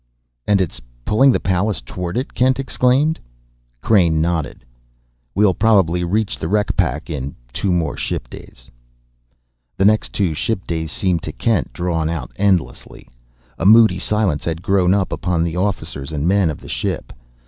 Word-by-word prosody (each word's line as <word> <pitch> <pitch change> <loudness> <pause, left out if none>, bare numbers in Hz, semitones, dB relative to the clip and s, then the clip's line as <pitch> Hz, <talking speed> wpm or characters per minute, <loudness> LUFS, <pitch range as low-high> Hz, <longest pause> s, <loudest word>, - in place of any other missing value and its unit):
"And 105 -1 +3
it's 90 -5 -2 0.2
pulling 135 +6 +4
the - - +1
Pallas 95 +3 0
toward 85 - -5
it?" 130 - -3
Kent 130 +1 +2
exclaimed. 135 +4 +1 0.6
Crain 85 -7 +3
nodded. 80 -6 -2 0.7
"We'll 100 -1 +4
probably 95 -5 +2
reach 105 +4 -1
the 80 - -3
wreck 105 +3 0
pack 75 +6 -1
in 70 -2 -5 0.2
two 100 - -1
more 85 -4 0
ship - - -4
days." - - -13 1.1
The 95 - +2
next 110 +1 +3
two 95 -6 0
ship 95 +5 -2
days 80 -2 -3
seemed 90 -2 0
to 80 - -5
Kent 110 +3 0
drawn 85 -3 -1
out 75 -7 -4
endlessly. 90 -11 -1 0.5
A 85 - -2
moody 110 -4 +6
silence 100 -6 0
had 85 +1 -3
grown 95 -1 +3
upon 90 -3 -1
the 85 0 -2
officers 90 -7 -3
and 75 +1 -2
men 95 -2 +3
of 75 - -6
the - - -12
ship. - - -4
90 Hz, 160 wpm, -19 LUFS, 80-105 Hz, 1.1 s, moody